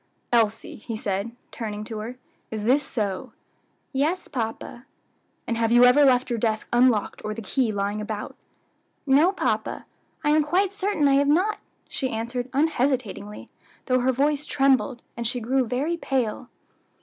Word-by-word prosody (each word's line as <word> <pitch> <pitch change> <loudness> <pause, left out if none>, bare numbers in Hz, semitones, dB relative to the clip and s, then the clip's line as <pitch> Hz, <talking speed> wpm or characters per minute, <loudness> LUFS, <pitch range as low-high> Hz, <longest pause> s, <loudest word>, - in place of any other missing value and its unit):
"Elsie," 225 -2 +1
he 225 +1 -6
asked, 200 -1 -2 0.2
turning 210 -2 -5
to 220 0 -6
her, 235 +4 -6 0.3
"is 215 -2 -4
this 260 +6 +4
so?" 210 -9 -3 0.6
"Yes, 310 +7 0
papa." 240 0 -5 0.6
"And 230 - -2
have 230 0 +1
you 240 +1 +7
ever 255 +4 +6
left 255 -2 +3
your 235 - 0
desk 220 -1 -1
unlocked, 240 -4 +3
or 215 0 -3
the 230 - -6
key 240 +2 0
lying 205 +1 -2
about?" 210 0 -5 0.7
"No, 290 +6 +5
papa. 390 - -2 0.4
I 295 - +3
am 310 +1 +5
quite 370 +6 +1
certain 395 -7 +1
I 275 - +4
have 280 0 +3
not," 370 +9 +2 0.3
she 260 - -3
answered 245 +2 -3
unhesitatingly, 260 -8 -1 0.4
though 255 -1 +2
her 255 +1 +2
voice 285 +3 +1
trembled, 265 -2 +2
and 235 -1 -2
she 245 +2 -2
grey 260 +4 +1
very 265 +8 -1
pale. 255 -5 -2
250 Hz, 160 wpm, -25 LUFS, 220-280 Hz, 0.7 s, you